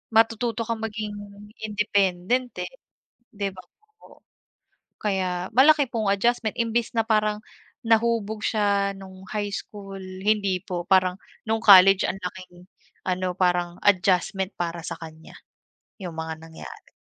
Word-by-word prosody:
matututo 230 +1 +2
kang 225 0 -3
maging 215 -1 -4 0.5
independent, 210 +2 0
eh, - - -7 0.6
'di 200 -1 -2
ba 185 -1 -12 0.3
po? - - -19 0.8
Kaya 185 -3 -1
malaki 275 +3 +5
pong 220 -5 +1
adjustment 225 +1 +1
imbes 230 0 -1
na 225 - +2
parang 215 -1 +1 0.4
nahubog 225 -2 +1
siya 200 -2 +1
nung 190 -1 -12
high 205 -1 -1
school, 200 -1 -7 0.2
hindi 200 -3 +1
po. 175 -1 -5
Parang 185 -1 +3 0.3
nung 220 0 +2
college 195 -2 +8
ang 195 - -3
laking 180 0 -9 0.3
ano 185 0 -1
parang 175 -1 0
adjustment 190 0 +2
para 170 -1 -4
sa - - -4
kanya, 160 -1 -11 0.6
yung 180 -5 -7
mga 160 0 -5
nangyari. 160 0 -12
200 Hz, 125 wpm, -25 LUFS, 185-220 Hz, 0.8 s, college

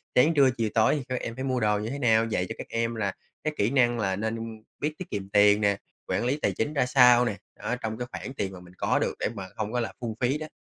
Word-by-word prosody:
sáng, 150 +6 +5
trưa, 140 -4 +5
chiều, 115 -2 0
tối 110 +5 +4
thì 145 - -3
các 125 - -2
em 115 - -5
phải 130 - -4
mua 130 -2 0
đồ 105 -2 +2
như 110 +2 -3
thế 140 +3 -4
nào? 115 -3 +4
Dạy 100 -5 -1
cho - - -4
các - - -7
em 115 0 -1
là 100 -4 -1 0.3
các 155 - -1
kỹ 100 - +2
năng 120 -3 +3
là 95 -3 0
nên 110 +1 -4 0.2
biết 150 +1 -1
tiết 185 -2 -7
kiệm 100 -1 -4
tiền 105 +1 +5
nè, 100 -1 +2 0.3
quản - - 0
lý 130 +4 +1
tài - - +2
chính 145 +7 -2
ra 140 -4 +2
sao 125 -1 +6
nè, 105 - -1 0.2
á, - - -3
trong 110 0 -3
cái 125 +1 -4
khoản 130 - -6
tiền 95 -7 -3
mà 90 - -9
mình 90 0 -15
có - - +1
được - - 0
để - - 0
mà 95 -2 -6
không 110 +1 -3
có 125 - +1
là 115 - -3
phung 115 -3 -3
phí 130 +3 +1
đó. 155 0 -6
115 Hz, 295 wpm, -27 LUFS, 105-125 Hz, 0.3 s, sao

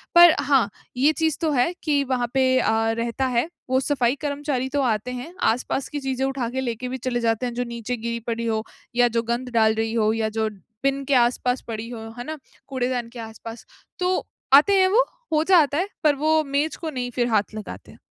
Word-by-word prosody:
पर 345 -1 +9
हाँ, 265 -6 +3 0.3
ये 280 +4 +4
चीज़ 320 -1 0
तो 320 -2 +1
है 275 +5 +2
कि 290 -3 +2
वहाँ 255 -2 -1
पे 265 0 +3 0.2
अ, 225 -2 +2
रहता 235 +3 -1
है 250 +5 0 0.2
वो 260 0 +3
सफ़ाई 265 -2 +1
कर्मचारी 285 -3 -2
तो 285 +1 0
आते 235 -1 0
हैं। 250 +7 -7
आसपास 250 +3 0
की 295 - -4
चीज़ें 265 -1 -1
उठा 270 -3 -2
के 260 +2 -3
लेके 245 -1 -3
भी 260 - -3
चले 250 -1 -2
जाते 230 +1 0
हैं, 245 - -3
जो 245 +1 -1
नीचे 235 0 -4
गिरी 235 +1 -3
पड़ी 230 0 -2
हो 220 -1 0 0.3
या 245 0 +5
जो 230 -1 0
गंद 250 +2 -2
डाल 220 -1 +4
रही 225 0 -1
हो 215 -2 +2
या 220 -1 0
जो 220 0 -1 0.3
बिन 275 0 +1
के 280 - 0
आसपास 250 +1 +2
पड़ी 225 -1 -5
हो, 240 -2 -7 0.2
है 245 - -5
ना? 315 +4 -6 0.3
कूड़ेदान 250 -2 -2
के 245 - -8
आसपास। 225 +1 -9 0.3
तो, 365 0 0 0.3
आते 300 +9 +7
हैं 375 - +5
वो, 440 +6 +4 0.3
हो 305 0 +3
जाता 320 -6 +4
है, 365 +4 0 0.2
पर 300 -2 +4
वो 310 +2 +2
मेज 285 +2 -1
को 325 - -5
नहीं 250 -4 -3
फिर 240 0 0
हाथ 215 -3 +1
लगाते 215 - -8
हैं। - - -18
250 Hz, 220 wpm, -23 LUFS, 235-285 Hz, 0.3 s, पर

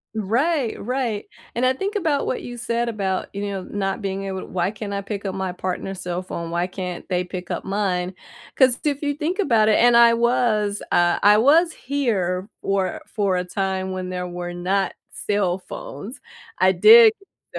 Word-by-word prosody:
Right, 240 - 0
right, 240 -3 -2 0.3
and 245 +2 0
I 260 - +4
think 395 +9 -4
about 315 -8 0
what - - -2
you 245 0 -8
said 235 0 -1
about, 195 -4 -2
you 200 +1 -3
know, 195 -1 -4
not 195 +1 -3
being 195 0 -3
able 190 -1 -5
why 185 +2 -1
can't 210 -1 -6
I 200 - -2
pick 200 0 -6
up 195 -1 -3
my 190 -1 -2
partner's 185 +1 -4
cell 180 0 -3
phone, 170 -2 -5
why 170 +1 0
can't 180 -1 -6
they 180 -1 0
pick 180 0 -7
up - - -3
mine? 190 -2 -1 0.4
'Cause 260 -2 +4
if 285 -1 0
you 290 - 0
think 315 +6 -2
about 230 - +3
it 215 - +4
and 240 0 +5
I 235 0 +7
was, 230 -3 +1
uh, 175 0 +3
I 210 +1 +6
was 315 +9 +4
here 200 -10 -1
for 195 -2 -1
for 200 -4 -1
a 180 - -1
time 190 +1 -2
when 185 -1 -4
there 180 0 -4
were 175 0 -5
not 185 +2 -1 0.2
cell 195 -3 -1
phones. 210 +5 -9 0.4
I - - +4
did 450 +1 +8
get 395 - -14
200 Hz, 190 wpm, -22 LUFS, 185-240 Hz, 0.4 s, did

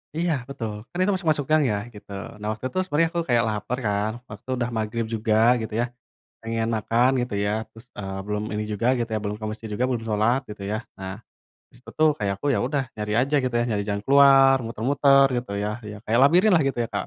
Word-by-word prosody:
Iya 170 0 +1 0.2
betul, 115 -6 -4 0.2
kan - - -9
itu 205 - +2
masuk-masuk 155 -6 0
gang 155 -1 +5
ya, 105 - 0 0.2
gitu. 105 -1 -13 0.3
Nah 105 - -5
waktu 110 - -9
itu - - -6
sebenarnya 165 0 +2
aku 170 - -1
kayak 120 -1 +4
laper 105 +4 -3
kan, 105 +1 0 0.2
waktu 105 - -9
itu - - -3
udah 120 0 -1
magrib 110 +1 -2
juga 110 0 0 0.3
gitu 110 -1 -6
ya - - +1 0.6
pengen 115 0 -2
makan 115 +3 +2
gitu 120 -3 -4
ya, 105 - 0 0.2
terus, 115 +2 -15
eee, 95 -1 -5
belum 105 0 -2
ini 105 0 -2
juga 105 +3 -1
gitu 120 -1 -2
ya, 110 - 0
belum 105 0 -2
ke - - -3
masjid 110 +1 -8
juga, 120 - -1
belum 120 -3 -2
salat 110 +4 +2
gitu 105 -1 -8
ya. 110 - 0 0.2
Nah 95 0 -5 0.6
di - - -29
situ 125 - -13
tuh 155 0 +5
kayak 100 -2 0
aku, - - -2
ya - - +1
udah 140 +1 0
nyari 105 -1 -3
aja 140 +4 0
gitu 130 -2 -2
ya, - - +2
nyari 105 -2 0
jangan 100 0 -2
keluar, 135 0 +6
muter-muter 135 +4 +4
gitu 120 -4 -4
ya, - - -1 0.2
ya 105 - -8
kayak 115 +2 +1
labirinlah 175 +5 +5
gitu 135 - -4
ya, - - -6
Kak, 100 - -2
115 Hz, 230 wpm, -24 LUFS, 105-135 Hz, 0.6 s, keluar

